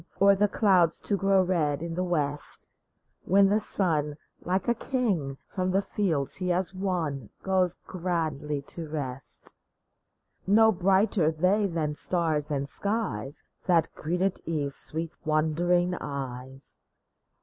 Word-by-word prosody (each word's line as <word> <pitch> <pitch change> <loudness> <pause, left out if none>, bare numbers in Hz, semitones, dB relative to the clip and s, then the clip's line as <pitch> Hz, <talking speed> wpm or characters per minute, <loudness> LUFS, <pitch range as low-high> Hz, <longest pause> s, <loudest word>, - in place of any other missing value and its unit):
Or 200 0 +6
the 205 +2 +3
clouds 185 -6 +3
to 205 - 0
grow 195 -1 +3
red 160 -5 0
in 170 -1 -4
the 180 +2 -1
west, 150 -5 0 0.6
When 195 +1 +5
the 210 +2 +3
sun, 155 -8 +1 0.3
like 185 +2 -1
a 235 - +4
king, 210 - -2
from 185 -1 -2
the 195 +2 +1
fields 165 -12 -1
he 185 -1 -2
has 180 +1 0
won, 170 - -3
Goes 185 -2 +2
grandly 155 -5 -2
to 165 +3 -8
rest? 135 -4 -1 0.9
No 220 +3 +6
brighter 190 -2 +2
they 185 +6 +2
than 160 -4 -2
stars 155 -2 +1
and 140 -2 -1
skies 165 - -1 0.2
That 170 -3 +2
greeted 180 +4 -2
Eve's 145 -4 -2
sweet, 160 +1 0
wondering 170 +4 +1
eyes 135 -1 -7
175 Hz, 130 wpm, -27 LUFS, 150-190 Hz, 0.9 s, Or